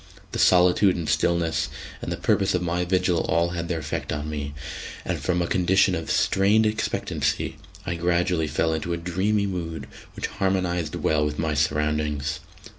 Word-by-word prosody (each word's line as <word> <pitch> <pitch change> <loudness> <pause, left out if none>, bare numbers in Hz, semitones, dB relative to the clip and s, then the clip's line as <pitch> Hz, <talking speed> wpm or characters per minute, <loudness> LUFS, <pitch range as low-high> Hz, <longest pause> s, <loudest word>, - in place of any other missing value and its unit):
The - - -3
solitude 90 +2 +5
and 85 -3 -3
stillness, 80 +2 +1 0.3
and - - -4
the - - -2
purpose 95 -2 +2
of 90 - 0
my 90 +1 0
vigil, 90 -1 +2
all 85 +1 +2
had 85 -1 -4
their 85 - -1
effect 80 - -4
on 75 +1 -3
me, 75 -1 -4 0.5
and - - -2
from 90 -1 0
a - - -2
condition 95 +1 +3
of 80 -2 -3
strained 100 +3 +3
expectancy 110 +1 -1 0.3
I - - -1
gradually 85 -1 +1
fell 80 +2 0
into 80 +2 -2
a - - -1
dreamy 95 +5 0
mood 85 -4 -4 0.3
which - - -3
harmonised 90 -4 -1
well 75 -1 +1
with 75 0 -2
my 80 -2 0
surroundings. 75 0 0
85 Hz, 170 wpm, -25 LUFS, 80-90 Hz, 0.5 s, solitude